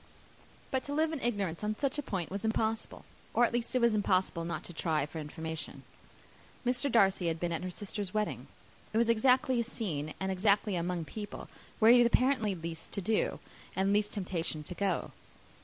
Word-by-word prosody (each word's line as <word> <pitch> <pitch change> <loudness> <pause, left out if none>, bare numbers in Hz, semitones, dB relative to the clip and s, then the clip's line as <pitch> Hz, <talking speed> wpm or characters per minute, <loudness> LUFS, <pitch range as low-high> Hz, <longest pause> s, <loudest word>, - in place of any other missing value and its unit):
But 260 -1 0
to 285 - -3
live 320 +1 +2
in 295 - -3
ignorance 200 -7 -1
on 210 0 0
such 280 +1 0
a - - +1
point 190 - -3
was 200 +2 -3
impossible; 220 0 -1 0.3
or 240 - +6
at 235 - -2
least 240 +1 -1
it 255 - +3
was 235 -1 +4
impossible 185 -4 +1
not 170 +1 -4
to 175 - -8
try 155 -2 0
for 160 +2 -7
information. 160 +1 -5 0.8
Mr. 250 +2 +2
Darcy 195 -5 +4
had 165 -1 -1
been 175 0 -1
at 165 - -2
her 185 - -2
sister's 200 +1 -4
wedding. 215 0 -2 0.5
It - - +1
was 230 0 +4
exactly 250 +2 +3
a - - +2
scene, 165 - -4
and 190 0 -1
exactly 200 +1 +2
among 175 -1 -1
people, 205 +4 -7 0.3
where 225 +1 +7
he 245 - +8
had 240 - +6
apparently 235 -5 +2
least 165 -1 -6
to 200 - -1
do, 215 +4 +1 0.4
and 195 +1 +2
least 210 0 +2
temptation 170 -5 -2
to 180 - -7
go. 195 -1 -1
205 Hz, 195 wpm, -32 LUFS, 175-235 Hz, 0.8 s, he